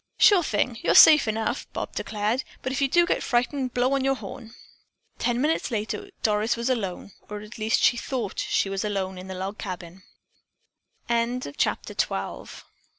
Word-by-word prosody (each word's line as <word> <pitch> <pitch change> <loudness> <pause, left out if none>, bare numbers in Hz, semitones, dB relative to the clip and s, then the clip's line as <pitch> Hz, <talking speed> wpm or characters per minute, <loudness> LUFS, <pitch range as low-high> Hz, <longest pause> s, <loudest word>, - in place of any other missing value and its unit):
"Sure 400 -4 +6
thing. 230 -4 -1
You're - - +2
safe 305 -6 +9
enough!" 220 +4 -2
Bob - - -4
declared. 215 +4 -1 0.2
"But 260 - -2
if 270 +1 -2
you 275 - +4
do 345 +5 +4
get - - 0
frightened, 250 +1 -1
blow 250 +2 +2
on 275 -1 +1
your 270 0 +2
horn." 235 -2 -9 0.6
Ten 240 0 0
minutes 305 +4 0
later 230 - -3
Doris 215 +2 +1
was 235 +3 0
alone, 200 -5 -3 0.2
or 210 0 -6
at 215 +2 -11
least 220 +1 +1
she 240 - +4
thought 235 -5 -3
she - - +1
was 195 +1 -2
alone 190 -3 -2
in 185 - -9
the 190 - -6
log 190 +3 -5
c 180 -3 -7
230 Hz, 160 wpm, -25 LUFS, 205-260 Hz, 0.6 s, safe